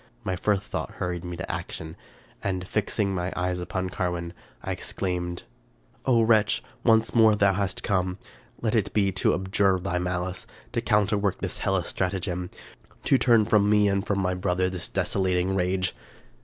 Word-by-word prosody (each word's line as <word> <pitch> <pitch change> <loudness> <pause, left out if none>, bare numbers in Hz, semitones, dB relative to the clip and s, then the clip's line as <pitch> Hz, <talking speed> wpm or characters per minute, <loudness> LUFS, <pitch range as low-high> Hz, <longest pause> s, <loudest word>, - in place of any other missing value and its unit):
My 95 - -1
first 100 +2 +1
thought - - -5
hur 90 - -2
ried 85 -1 -5
me 90 -1 -5
to - - -4
action, 80 +1 -6 0.5
and, 95 -2 -2
fixing 105 -1 0
my 90 0 -2
eyes 90 0 -1
upon 90 +1 -3
Carwin, 85 -1 -2 0.3
I - - -3
exclaimed, 90 -2 -3 0.2
— - - -36
" - - -34
O 120 -3 +5
wretch! 110 -2 +3 0.2
once 115 -1 +4
more 110 -2 +5
hast 100 -1 +1
thou - - -4
come? 95 -3 0 0.5
Let 110 - +1
it 110 -5 +1
be 100 -2 +2
to 95 - +2
abjure 95 0 +2
thy 90 -1 -1
malice; 90 +1 -3 0.2
to 115 - -1
counterwork 105 -3 +2
this - - -3
hellish 95 -2 +1
stratagem; 90 -1 -2 0.5
to 135 - +4
turn 115 -4 +5
from 105 -1 +3
me 105 -1 +5
and 100 -1 +1
from 100 -1 -1
my 90 -1 +1
brother 90 0 0
this 90 -3 -3
desolating 95 -1 +1
rage 90 0 0
95 Hz, 175 wpm, -26 LUFS, 90-105 Hz, 0.5 s, O